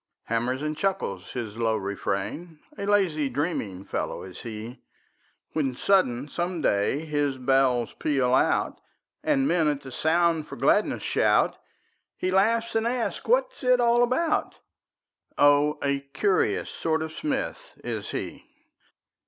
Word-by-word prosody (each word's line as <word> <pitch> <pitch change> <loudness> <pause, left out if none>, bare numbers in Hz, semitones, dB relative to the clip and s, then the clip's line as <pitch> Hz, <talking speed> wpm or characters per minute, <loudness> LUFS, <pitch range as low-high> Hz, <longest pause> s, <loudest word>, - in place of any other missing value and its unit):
Hammers 120 +4 -1
and 155 0 -2
chuckles 170 - -2
his 115 -4 -5
low 115 -1 +1
refrain, 100 - -3 0.2
A 200 - -5
lazy, 175 -9 +2
dreaming 120 - -3
fellow - - -3
is 95 -1 -10
he: 115 +2 -7 0.7
When 135 -5 0
sudden, 140 -8 +2
some 175 +3 -3
day, 135 +4 +1
his 145 -3 0
bells 130 -2 +2
peal 135 -4 +1
out, 130 - +2 0.4
And 275 -2 +2
men, 170 - +2
at 145 -1 0
the 135 - -10
sound, 165 +1 +1
for - - -8
gladness - - +2
shout; - - +2 0.6
He 185 - -1
laughs 225 +4 +2
and 225 0 +1
asks 240 -1 -2
what - - +3
it's 250 - +2
all 240 0 +4
about; 260 +7 +1 0.8
Oh, 145 +1 +4
a 140 0 +1
curious 155 +8 0
sort 160 -1 -1
of 160 - -5
smith 300 - -4
is - - -4
he. - - -5
150 Hz, 135 wpm, -26 LUFS, 125-195 Hz, 0.8 s, all